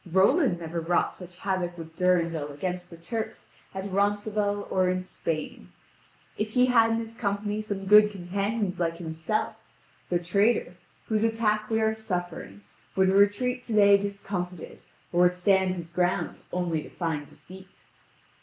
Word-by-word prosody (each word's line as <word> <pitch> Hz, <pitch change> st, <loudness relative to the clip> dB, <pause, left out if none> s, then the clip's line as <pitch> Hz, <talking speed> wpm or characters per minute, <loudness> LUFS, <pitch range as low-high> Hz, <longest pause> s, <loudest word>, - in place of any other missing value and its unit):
Roland 195 Hz, -, +4 dB
never 170 Hz, 0 st, -4 dB
wrought 170 Hz, +2 st, +1 dB
such 180 Hz, -1 st, -12 dB
havoc 180 Hz, -2 st, -2 dB
with 160 Hz, -1 st, -9 dB
Durendal 170 Hz, -5 st, +1 dB
against 180 Hz, +4 st, -4 dB
the 170 Hz, -, -11 dB
Turks 220 Hz, +7 st, -5 dB, 0.3 s
at 190 Hz, 0 st, -5 dB
Ronceval 205 Hz, +1 st, 0 dB
or 185 Hz, -1 st, +2 dB
in 185 Hz, 0 st, -1 dB
Spain! 160 Hz, -4 st, -5 dB, 0.7 s
If 215 Hz, +1 st, -2 dB
he 250 Hz, 0 st, +5 dB
had 230 Hz, -3 st, +4 dB
in 225 Hz, -, +1 dB
his 225 Hz, 0 st, -5 dB
company 205 Hz, -1 st, -2 dB
some 200 Hz, -2 st, -4 dB
good 210 Hz, +1 st, +7 dB
companions 200 Hz, +1 st, -2 dB
like 165 Hz, -1 st, 0 dB
himself, 160 Hz, +4 st, -2 dB, 0.5 s
the 175 Hz, -, +2 dB
traitor, 200 Hz, +7 st, +1 dB, 0.3 s
whose 215 Hz, -1 st, 0 dB
attack 215 Hz, -2 st, +1 dB
we 225 Hz, 0 st, +1 dB
are 220 Hz, 0 st, +2 dB
suffering, 175 Hz, -, -5 dB, 0.3 s
would 190 Hz, 0 st, +4 dB
retreat 205 Hz, +6 st, +3 dB
today 205 Hz, -3 st, +5 dB
discomfited, 195 Hz, -3 st, -4 dB, 0.3 s
or 175 Hz, -, +3 dB
would 180 Hz, 0 st, +5 dB
stand 190 Hz, 0 st, +2 dB
his 170 Hz, -2 st, -8 dB
ground 180 Hz, +1 st, 0 dB
only 175 Hz, -3 st, -1 dB
to -, -, -11 dB
find 160 Hz, -4 st, -3 dB
defeat." 190 Hz, +4 st, -15 dB
190 Hz, 150 wpm, -27 LUFS, 175-210 Hz, 0.7 s, good